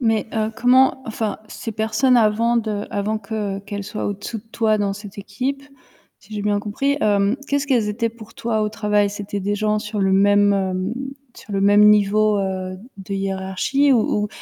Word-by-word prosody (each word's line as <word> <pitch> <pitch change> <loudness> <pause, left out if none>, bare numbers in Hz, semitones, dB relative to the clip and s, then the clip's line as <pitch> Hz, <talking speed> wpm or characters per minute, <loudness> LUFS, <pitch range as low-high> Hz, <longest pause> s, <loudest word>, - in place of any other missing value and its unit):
Mais 225 -3 +1
heu, 220 -1 0
comment, 260 +2 +4
enfin, 220 -1 -3
ces 225 - -6
personnes 220 +4 +2
avant 230 +1 +3
de 215 -3 -2
avant 215 0 -1
que 205 -2 -4
qu'elles 200 0 -6
soient 210 +1 -5
au-dessous 205 +3 -4
de - - -14
toi 220 -2 +2
dans 205 -1 0
cette 205 0 -10
équipe, 255 +8 -3 0.6
si 215 +2 -13
j'ai 205 - -3
bien 205 0 +1
compris, 245 +8 -1
hem, 205 +1 +2
qu'est-ce 285 0 0
qu'elles 240 -6 +2
étaient 230 +2 -1
pour 225 -1 -13
toi 220 -2 -1
au 210 - 0
travail? 210 -1 +1
C'était 205 0 -5
des 205 +2 -1
gens 215 +1 0
sur 210 -1 -4
le 195 -1 +2
même, 205 +1 +4
hem, 190 +1 -1 0.4
sur 210 - -11
le 195 - 0
même 205 +1 +6
niveau, 210 0 +4
heu, 185 -1 -3 0.2
de 195 0 -6
hiérarchie 195 +8 0
ou 215 -3 +2
ou - - -4
210 Hz, 190 wpm, -21 LUFS, 200-225 Hz, 0.6 s, même